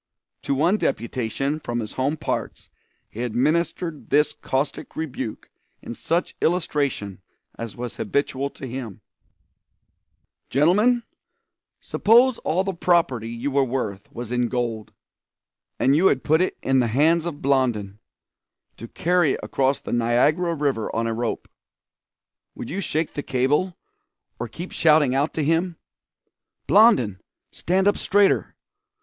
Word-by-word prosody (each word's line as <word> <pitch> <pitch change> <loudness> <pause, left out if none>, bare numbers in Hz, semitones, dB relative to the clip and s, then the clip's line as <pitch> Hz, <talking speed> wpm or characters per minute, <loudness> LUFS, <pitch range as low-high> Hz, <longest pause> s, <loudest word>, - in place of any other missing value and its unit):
To 140 - -1
one 170 +9 +2
deputation 130 - -2
from 120 -5 -3
his 110 -2 -5
home 140 +4 -1
parts - - -4 0.4
he 115 - -8
administered 150 +6 -1
this 150 0 +3
caustic 135 +3 -3
rebuke 135 -7 -5 0.3
in - - -8
such 170 +8 -1
illustration 140 - -1 0.3
as 115 -2 -7
was 120 -1 -6
habitual 140 +4 -1
to 135 - -10
him: 120 -5 -7 1.5
"Gentlemen, 210 - +3 0.8
suppose 235 +3 +3
all 180 +4 0
the 195 0 -2
property 165 -10 +1
you 120 +5 -3
were 140 0 +3
worth 120 -6 -4
was 120 -1 -7
in 125 -1 +1
gold, 115 -3 -3 0.9
and 135 +2 +3
you 180 +5 +5
had 130 - +1
put 160 +3 +3
it 185 - -1
in 135 0 +3
the 120 - +2
hands 160 +8 +2
of 150 -4 -5
Blondin, 120 -7 0 0.8
to 115 - -8
carry 175 +1 +1
across 135 0 0
the - - -6
Niagara 140 +9 +2
River 140 -7 -1
on 115 +1 0
a 115 - -1
rope, 115 0 -3 1.1
would - - -7
you 195 +4 -2
shake 155 -2 -2
the 145 - -3
cable, 145 +9 0 0.6
or - - -3
keep 170 +10 -8
shouting 155 -5 +4
out 140 +4 +1
to 155 - 0
him: 165 +3 0 0.9
"'Blondin, 135 - +4 0.3
stand 190 +3 0
up 205 - +2
straighter! 205 0 +2
140 Hz, 135 wpm, -23 LUFS, 120-170 Hz, 1.5 s, you